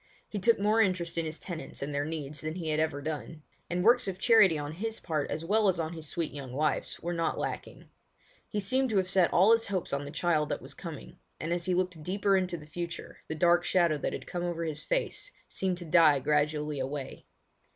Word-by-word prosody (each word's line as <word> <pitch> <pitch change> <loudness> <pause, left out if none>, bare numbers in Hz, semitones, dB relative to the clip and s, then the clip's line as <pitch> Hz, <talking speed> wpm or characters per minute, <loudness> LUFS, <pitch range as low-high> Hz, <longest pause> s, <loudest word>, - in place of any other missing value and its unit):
He 210 - -4
took 230 +3 +4
more 210 +3 +3
interest 180 -4 0
in 165 - -1
his 155 +1 -5
tenants 160 -7 -6
and 145 +1 -4
their 145 +1 0
needs 150 -2 -5
than 155 +1 -4
he 170 -3 -3
had 155 0 +1
ever 155 -3 -1
done; 155 0 -5 0.3
and 180 +1 0
works 240 +2 +5
of 190 -2 -3
charity 195 -5 +6
on 145 0 -4
his 220 +7 -4
part 155 -4 -2
as 160 +2 -3
well 210 +3 +3
as 185 -3 +2
on 160 0 -2
his 160 -2 -7
sweet 165 +1 -3
young 135 -3 -7
wife's 150 +2 0
were 175 +1 -2
not 165 -1 0
lacking. - - -5 0.6
He 210 - -1
seemed 260 +6 +1
to 215 - +1
have 190 -1 +2
set 185 -2 +3
all 190 +6 +6
his 230 0 +4
hopes 190 -6 -2
on 140 0 0
the 145 - -6
child 155 -1 +1
that - - -1
was - - -9
coming, - - -9 0.2
and 165 +2 -1
as 175 -1 -2
he 185 -1 +1
looked 180 -3 -1
deeper 195 +4 +1
into 185 -2 0
the 150 - -11
future 170 +2 -6
the 160 - -3
dark 175 +2 +4
shadow 170 -5 +2
that - - -2
had - - -5
come 175 -1 -4
over 170 -1 -2
his 155 -2 -3
face - - -1 0.2
seemed 185 -2 -1
to 175 - -8
die 160 -3 +6
gradually 150 +1 0
away. 135 +1 -5
170 Hz, 235 wpm, -30 LUFS, 150-190 Hz, 0.6 s, charity